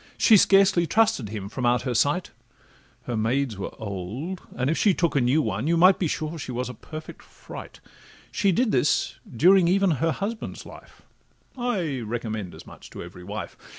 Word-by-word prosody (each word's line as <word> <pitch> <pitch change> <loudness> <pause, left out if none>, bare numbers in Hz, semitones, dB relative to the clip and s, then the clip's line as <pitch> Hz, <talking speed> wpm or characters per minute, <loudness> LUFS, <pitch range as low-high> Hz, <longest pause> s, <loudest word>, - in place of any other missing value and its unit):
She 225 - +6
scarcely 195 -3 +5
trusted 220 - +2
him 105 -2 -5
from 125 +5 -6
out 120 0 +2
her 125 - -2
sight; 145 +9 +1 0.7
Her 120 - -4
maids 120 +2 0
were 100 - -3
old, 110 - -5
and 130 - -1
if 155 - +1
she 200 0 +3
took 170 -4 0
a 140 - +3
new 135 +6 +2
one, 110 +5 -2
You 170 +1 +2
might 185 +3 +6
be 175 - +1
sure 155 +2 -3
she 130 - -6
was 125 +1 -3
a - - -6
perfect 155 +7 -10
fright; - - -11 0.5
She 200 -2 +2
did 230 +5 +1
this 145 - +1
during 175 +8 +5
even 195 +1 +3
her 165 0 +2
husband's 210 +6 -5
life— - - -14 0.5
I 195 - -2
recommend 110 -4 -4
as - - -12
much - - -13
to - - -8
every 90 - -11
wife. 105 +4 -6
150 Hz, 185 wpm, -25 LUFS, 115-185 Hz, 0.7 s, She